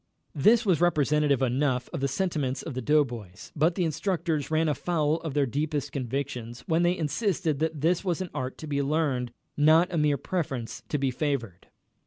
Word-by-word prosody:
This 220 - +4
was 180 -5 +2
representative 150 -4 +2
enough 130 0 +1
of - - -2
the 140 - +1
sentiments 145 -4 -1
of 155 - -5
the 130 - -3
doughboys, 120 -9 -1
but 165 +3 +2
the 180 - 0
instructors 165 -2 -1
ran 160 0 +2
afoul 155 0 +1
of 160 -4 -6
their 145 -1 +3
deepest 145 +2 -2
convictions 125 -2 -4
when 165 +1 +1
they 175 +1 +2
insisted 160 -2 -1
that 160 -2 -1
this 170 +4 +2
was 180 -4 -1
an 185 -2 -4
art 130 0 -4
to 155 - -8
be 140 -1 0
learned, 140 -4 0 0.2
not 160 +4 +4
a 165 - +1
mere 150 -1 +2
preference 135 -7 -3
to 150 - 0
be 135 -2 0
favored. 125 - -3
150 Hz, 185 wpm, -27 LUFS, 135-165 Hz, 0.2 s, This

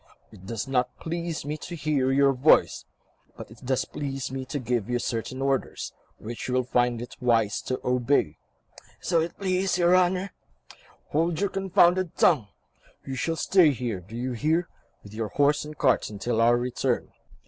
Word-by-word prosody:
"It 95 -3 -14
does 115 +3 -4
not 125 -2 +1
please 170 -2 -4
me 150 +1 -3
to 170 +3 -7
hear 145 -5 0
your 140 0 +4
voice, 135 +4 +3 0.5
but - - -9
it 115 - -15
does 130 0 0
please 135 -3 -5
me 130 0 -4
to 140 +3 -4
give 120 -4 -2
you 125 - +1
certain 120 +2 -3
orders, 135 -1 -2 0.2
which 115 +1 -7
you 125 - -1
will 130 - +2
find 120 -1 0
it 120 - -10
wise 115 -4 +2
to 130 - -1
obey." 125 - +1 0.6
"So 170 -2 +1
it 165 +1 -4
please 185 -2 0
your 175 0 +4
Honour.. 185 +1 +1 0.4
." - - -29
"Hold 165 +2 +1
your 200 -1 0
confounded 185 -2 +2
tongue. 140 - +4 0.6
You 135 - -5
shall 165 +5 -1
stay 180 -1 +4
here, 120 -6 -3
do 95 +6 -12
you 125 +2 -3
hear? 160 +8 0 0.4
with 100 - -13
your 110 0 -3
horse 145 +6 +2
and 150 0 -9
cart - - +2
until 110 +3 -1
our 120 +1 +5
return. 125 +1 -1
135 Hz, 180 wpm, -26 LUFS, 120-165 Hz, 0.6 s, our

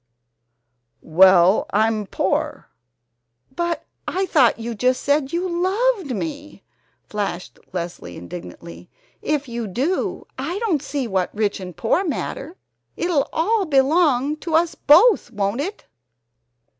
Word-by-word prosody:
"Well, 185 +3 +5
I'm 215 -1 +1
POOR." - - -2 0.9
"But 345 -1 -2 0.2
I 380 +1 0
thought 275 -10 +3
you 230 +1 -5
just 250 +3 0
said 285 -1 +1
you 350 +2 -1
loved 375 - 0
me!" 300 +3 -6 0.4
flashed 200 -4 -5
Leslie 170 - -6
indignantly. 90 0 -10 0.3
"If 295 -2 -1
you 235 -2 -4
do, 265 - -2
I 320 +8 -3
don't 400 - 0
see 275 -3 -3
what 190 -4 0
rich 210 -2 0
and 180 -3 -9
poor 240 +11 +1
matter. 325 0 -4 0.4
It'll 340 -5 0
all 400 +5 +1
belong 285 0 +2
to 320 0 -3
us 335 0 +2
both, 350 - +5
won't 205 +2 -2
it?" 390 +7 -6
275 Hz, 120 wpm, -21 LUFS, 205-340 Hz, 0.9 s, Well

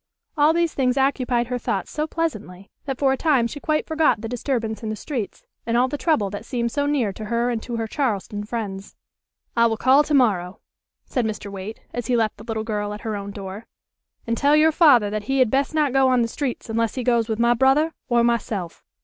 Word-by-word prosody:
All 300 0 +5
these 335 0 +1
things 255 -1 +1
occupied 255 -3 +1
her 250 +1 -3
thoughts 195 -5 -3
so 305 0 -2
pleasantly 215 - -4
that 270 -2 -3
for 270 -1 +3
a - - -2
time 280 -7 +2
she 290 +5 -5
quite 305 +1 0
forgot 315 -6 +2
the 225 - -4
disturbance 230 -2 -2
in 220 - -4
the 215 - -2
streets, 235 -3 -5 0.2
and 230 +1 0
all 250 +1 +4
the 280 - -4
trouble 280 - +1
that 205 +1 -6
seemed 235 -1 -2
so 285 +2 0
near 255 -9 0
to 215 - -7
her 235 +3 0
and 230 -2 -2
to 240 - -5
her 225 -1 -2
Charleston 215 -5 -2
friends. 205 -3 -5 0.6
"I 235 0 +5
will 225 -1 -1
call 260 +5 +5
to 300 - +1
morrow," 195 -9 +2 0.5
said 250 - -1
Mr. 210 -2 -4
Waite, 200 +3 -7
as 245 - -4
he 250 - +2
left 220 -2 0
the 210 - -11
little 220 -1 -3
girl 210 -2 -3
at 210 - -10
her 220 -2 -3
own 200 0 -5
door. 200 +1 -8 0.6
"And 230 - 0
tell 285 +4 +3
your 310 +1 +5
father 265 - +5
that 210 -1 -3
he 270 +4 0
had 255 -4 +3
best 275 +3 0
not 295 -4 +2
go 270 -1 +4
on 250 -2 +3
the - - 0
streets 255 +2 -4
unless 230 0 -1
he 255 - -2
goes 235 -2 +1
with 220 - -1
my 235 +1 +4
brother 270 +6 +3 0.2
or 240 -1 +3
myself." 215 -7 -2
235 Hz, 235 wpm, -23 LUFS, 215-270 Hz, 0.6 s, All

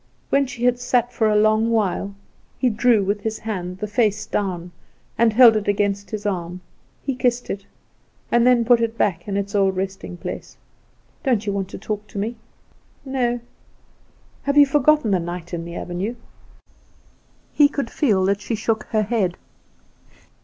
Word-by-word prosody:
When 275 0 +3
she 250 -1 -7
had 245 0 +3
sat 245 -1 +1
for 220 -2 +2
a 210 - +2
long 215 +1 +3
while, 200 -3 0 0.4
he 250 - +2
drew 220 -1 +3
with 200 +2 -1
his 220 +1 -3
hand 185 -5 -5
the 210 - -3
face 210 0 0
down, 180 -5 -3 0.4
and 230 -1 +3
held 230 0 +7
it 215 -1 -1
against 200 0 0
his 210 -1 -5
arm. 180 -2 -3 0.4
He 275 - -1
kissed 245 -1 0
it, 200 0 -6 0.6
and 240 +1 +4
then 245 -2 +4
put 240 0 +5
it 230 0 -1
back 175 -4 0
in 200 -1 -1
its 200 0 -3
old 195 -2 +2
resting 190 -1 -4
place. - - -7 0.7
"Don't 240 -7 +1
you 200 - -1
want 195 -1 -2
to - - -7
talk 210 0 -5
to - - -10
me?" 220 +4 -2 0.7
"No." 245 -3 -1 1.0
"Have 280 +1 -1
you 290 - +9
forgotten 290 -3 +3
the 190 - +3
night 175 0 -6
in 170 -1 -3
the 170 0 -8
avenue?" 185 +8 -4 1.4
He 290 - +6
could 280 -5 -3
feel 205 -11 +2
that 200 +1 +1
she 225 +3 -2
shook 220 0 -1
her 215 -1 0
head. 200 -5 0
215 Hz, 175 wpm, -22 LUFS, 195-240 Hz, 1.4 s, you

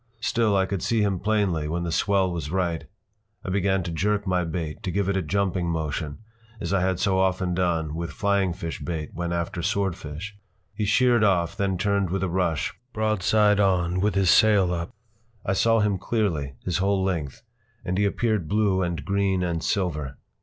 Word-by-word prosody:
Still 115 -3 +1
I 95 - +3
could 95 -2 -3
see 115 -2 +1
him 95 -3 0
plainly 100 -7 0
when 85 +2 -2
the 85 - -2
swell 95 +1 +2
was 80 -4 -4
right. 85 -2 -1 0.6
I 95 - -2
began 95 -1 +1
to 85 - -4
jerk 105 +5 0
my 90 -2 +1
bait, 80 +1 -4
to 100 - -3
give 100 +1 0
it 100 - +1
a 95 - +1
jumping 95 +1 0
motion, 75 -2 -3 0.4
as - - -3
I 95 - +2
had 95 -1 0
so 95 -2 +2
often 95 -1 +1
done 85 -4 0
with 85 +1 -4
flying 100 -2 +1
fish 85 -1 -5
bait 80 -3 -4
when 85 +1 -3
after 85 +2 -2
swordfish. 95 -1 -3 0.4
He 105 - -2
sheered 120 +2 +4
off, 90 -3 +2
then 100 -2 0
turned 100 0 +1
with 95 +1 -1
a 95 - 0
rush, 85 -5 0 0.2
broadside 105 -1 +2
on, 90 -2 +2
with 105 +2 +1
his 95 -2 +4
sail 100 -5 +5
up. 85 0 -3 0.6
I 95 - +1
saw 115 +3 +3
him 100 -2 +1
clearly, 85 - -1
his 90 0 0
whole 100 0 +1
length, 80 -8 -3 0.4
and 90 - -1
he 105 - +3
appeared 105 -4 0
blue 100 0 +2
and 85 -4 -2
green 100 -2 +1
and 85 -2 -2
silver. 75 -9 -1
95 Hz, 190 wpm, -25 LUFS, 85-100 Hz, 0.6 s, sail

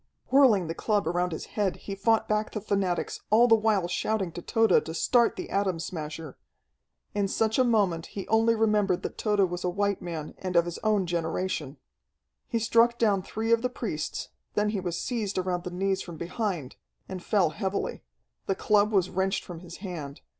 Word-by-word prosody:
Whirling 255 -9 +5
the 165 - -3
club 205 0 0
around 175 +1 0
his 160 - -5
head, 205 -3 0
he 200 - -7
fought 220 +3 +2
back 215 0 0
the 215 - -2
fanatics, 195 -4 -1
all 235 +3 +6
the 225 - +6
while 215 -5 +3
shouting 190 0 -1
to 175 - -7
Tode 225 +5 +3
to 160 - -6
start 235 +6 +3
the - - -6
Atom 195 -4 0
Smasher. 160 -3 -6 0.7
In 205 -1 +1
such 220 +4 +1
a - - +6
moment 200 -9 +1
he 195 - -7
only 225 +1 +3
remembered 210 -4 +2
that - - -5
Tode 210 -2 +2
was 180 -1 0
a 180 - +1
white 200 +2 0
man, 165 -4 -5
and 185 -1 -4
of 170 0 +5
his 175 -1 -5
own 210 -3 +1
generation. 165 -3 -2 0.7
He 235 - -1
struck 230 +1 +3
down 205 -5 +2
three 220 +4 -3
of 230 0 +4
the 250 - 0
priests; 210 -11 -4 0.3
then 210 0 +2
he 210 -2 -1
was 175 -2 -3
seized 220 -6 -2
around 180 -1 -1
the - - -2
knees 190 +2 -1
from 170 -2 -8
behind, 170 - -3 0.3
and 185 -2 -6
fell 185 -7 +2
heavily. 195 +2 -3 0.5
The 195 - +1
club 210 +1 +3
was 190 -3 +2
wrenched 190 0 0
from 175 -2 -8
his 175 0 -10
hand. 150 -6 -6
195 Hz, 195 wpm, -27 LUFS, 175-215 Hz, 0.7 s, all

